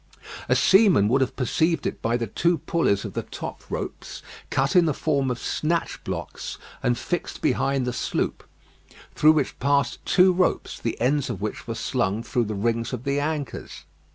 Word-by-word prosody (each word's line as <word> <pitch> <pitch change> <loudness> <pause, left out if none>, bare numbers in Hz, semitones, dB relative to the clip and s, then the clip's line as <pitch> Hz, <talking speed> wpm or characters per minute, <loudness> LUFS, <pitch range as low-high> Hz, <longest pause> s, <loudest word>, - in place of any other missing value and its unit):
A - - +4
seaman 190 - +5
would 135 +3 +3
have 130 - 0
perceived 160 +6 +1
it - - -3
by 115 +1 +1
the 120 - -2
two 170 - +1
pulleys 135 -10 0
of - - -6
the - - -2
top - - -7
ropes - - -6 0.3
cut 135 +4 +1
in 180 -2 +6
the 155 -4 0
form 140 -4 0
of 125 - -1
snatch 165 +6 -2
blocks, - - -5 0.2
and 120 -1 +1
fixed 175 +7 -3
behind 135 -2 +1
the 125 - -2
sloop, - - -2 0.7
through 155 +1 +6
which 150 -4 -1
passed 140 -2 +1
two 185 0 +5
ropes, 180 0 0
the 115 - -3
ends 135 +3 +1
of 110 -7 -4
which 105 +4 -5
were 115 - -3
slung 115 -2 -1
through 120 -1 0
the 105 0 -4
rings 115 +3 -1
of 125 -1 -4
the 140 +1 0
anchors. 145 -2 -4
135 Hz, 180 wpm, -24 LUFS, 115-155 Hz, 0.7 s, in